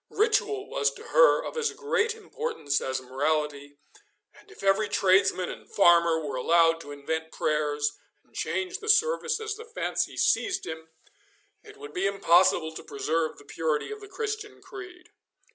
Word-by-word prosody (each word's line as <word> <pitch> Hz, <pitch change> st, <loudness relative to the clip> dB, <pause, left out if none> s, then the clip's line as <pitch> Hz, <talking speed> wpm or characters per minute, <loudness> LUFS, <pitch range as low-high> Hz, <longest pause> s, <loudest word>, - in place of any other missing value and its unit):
Ritual 415 Hz, -1 st, +1 dB
was 475 Hz, -1 st, +1 dB
to -, -, -11 dB
her -, -, +5 dB
of -, -, -6 dB
as 460 Hz, -1 st, 0 dB
great 455 Hz, -1 st, 0 dB
importance 445 Hz, -, -3 dB
as 130 Hz, 0 st, -2 dB
morality, 145 Hz, +2 st, -2 dB, 0.6 s
and 415 Hz, -, -20 dB
if 410 Hz, -, -14 dB
every 195 Hz, +2 st, +2 dB
tradesman 190 Hz, -1 st, +2 dB
and -, -, -12 dB
farmer 170 Hz, -3 st, +5 dB
were 140 Hz, -3 st, -4 dB
allowed 165 Hz, +4 st, +3 dB
to 145 Hz, -, -10 dB
invent 160 Hz, +3 st, -4 dB
prayers, 150 Hz, -1 st, -1 dB, 0.2 s
and -, -, -33 dB
change 370 Hz, +1 st, -3 dB
the 430 Hz, 0 st, -6 dB
service 475 Hz, +3 st, +3 dB
as 440 Hz, -1 st, -3 dB
the 455 Hz, -, -9 dB
fancy 470 Hz, +1 st, -2 dB
seized 390 Hz, -1 st, +1 dB
him, 160 Hz, 0 st, -7 dB, 0.7 s
it 425 Hz, -1 st, -14 dB
would 430 Hz, +1 st, -10 dB
be 365 Hz, -, 0 dB
impossible 175 Hz, -4 st, +3 dB
to -, -, -8 dB
preserve 155 Hz, +3 st, -2 dB
the 145 Hz, -, -16 dB
purity 155 Hz, -, -2 dB
of 425 Hz, 0 st, -7 dB
the 410 Hz, -, -10 dB
Christian 425 Hz, +1 st, -5 dB
creed. 365 Hz, -3 st, -11 dB
195 Hz, 160 wpm, -27 LUFS, -, 0.7 s, her